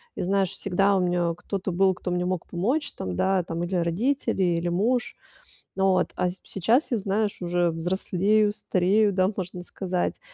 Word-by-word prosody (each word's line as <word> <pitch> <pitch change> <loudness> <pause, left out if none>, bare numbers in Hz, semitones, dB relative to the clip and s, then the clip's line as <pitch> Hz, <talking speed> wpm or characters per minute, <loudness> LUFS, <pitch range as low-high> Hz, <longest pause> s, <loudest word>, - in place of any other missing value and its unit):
И - - -4
знаешь, 195 0 +1
всегда 195 +2 +1
у - - +2
меня 175 -1 +1
кто-то 190 +2 -4
был, 190 +2 +3
кто 180 0 -5
мне 180 0 0
мог 180 -1 -2
помочь 265 - -1
там, 90 -1 -5
да, 190 - +2
там 165 0 -4
или 180 +2 -2
родители, 190 +7 0
или 175 -1 +1
муж. 225 +8 0 0.6
Ну 195 0 +1
вот, 185 -1 +1
а - - +1
п 180 - -1
сейчас 225 - +1
я, 235 - +1
знаешь, 205 +1 -1
уже 175 -1 +1
взрослею, 190 +5 +1
старею, 200 +2 +2
да, 185 +1 +2
можно 180 -1 -5
сказать. 180 0 -3
185 Hz, 180 wpm, -25 LUFS, 175-200 Hz, 0.6 s, был